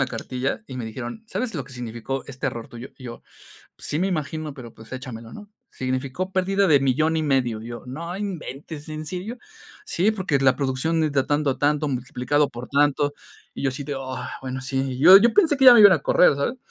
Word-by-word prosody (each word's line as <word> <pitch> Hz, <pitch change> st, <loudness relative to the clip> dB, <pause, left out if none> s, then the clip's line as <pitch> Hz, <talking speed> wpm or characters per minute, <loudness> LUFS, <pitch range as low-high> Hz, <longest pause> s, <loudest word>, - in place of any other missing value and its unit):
la 135 Hz, -, +2 dB
cartilla 125 Hz, -, -4 dB
y 130 Hz, -, -8 dB
me 125 Hz, -, -4 dB
dijeron: 120 Hz, -, -7 dB
"¿Sabes 225 Hz, +4 st, -3 dB
lo 140 Hz, -, -2 dB
que 130 Hz, +2 st, -14 dB
significó 120 Hz, +2 st, -5 dB
este 135 Hz, 0 st, -3 dB
error 115 Hz, -2 st, -6 dB
tuyo?" 120 Hz, +2 st, -10 dB
Y 130 Hz, -, -13 dB
yo: 120 Hz, -1 st, -8 dB, 0.5 s
"Pues -, -, -10 dB
sí 150 Hz, -, -1 dB
me 185 Hz, -, +1 dB
imagino, 155 Hz, -4 st, -3 dB
pero 120 Hz, -5 st, -10 dB
pues 110 Hz, +2 st, -15 dB
échamelo", 115 Hz, -3 st, -8 dB
¿no? 205 Hz, -1 st, -11 dB, 0.2 s
Significó 130 Hz, +8 st, -3 dB
pérdida 195 Hz, +1 st, +1 dB
de 150 Hz, -3 st, +6 dB
1500000. 135 Hz, -4 st, +1 dB
Y 115 Hz, -, -9 dB
yo: 120 Hz, 0 st, -7 dB
"No 170 Hz, +7 st, -6 dB
inventes, 160 Hz, -6 st, -6 dB
¿en 155 Hz, 0 st, -6 dB
serio?". 190 Hz, +9 st, -5 dB, 0.5 s
"Sí, 200 Hz, +6 st, +1 dB
porque 185 Hz, -9 st, 0 dB
la 135 Hz, -1 st, +4 dB
producción 140 Hz, +4 st, -1 dB
de 155 Hz, -1 st, +1 dB
ta 135 Hz, -2 st, 0 dB
tanto, 145 Hz, -2 st, 0 dB
tanto, 150 Hz, +1 st, +1 dB
multiplicado 130 Hz, +2 st, 0 dB
por 120 Hz, +1 st, -9 dB
tanto". 145 Hz, 0 st, +2 dB, 0.4 s
Y -, -, -6 dB
yo 135 Hz, -, +2 dB
así 130 Hz, +2 st, -6 dB
de: 140 Hz, 0 st, -4 dB
"Ah, 130 Hz, -1 st, -6 dB
bueno, 130 Hz, 0 st, -5 dB
sí". 135 Hz, -1 st, -2 dB
Yo 185 Hz, +6 st, +10 dB
yo 225 Hz, +4 st, +5 dB
pensé 325 Hz, -8 st, +4 dB
que 270 Hz, -, +2 dB
ya 250 Hz, -2 st, +11 dB
me 230 Hz, -, +7 dB
iban 205 Hz, -2 st, +9 dB
a 170 Hz, -, +3 dB
correr, 145 Hz, +1 st, +4 dB
¿sabes? 190 Hz, -, -1 dB
140 Hz, 215 wpm, -23 LUFS, 130-170 Hz, 0.5 s, ya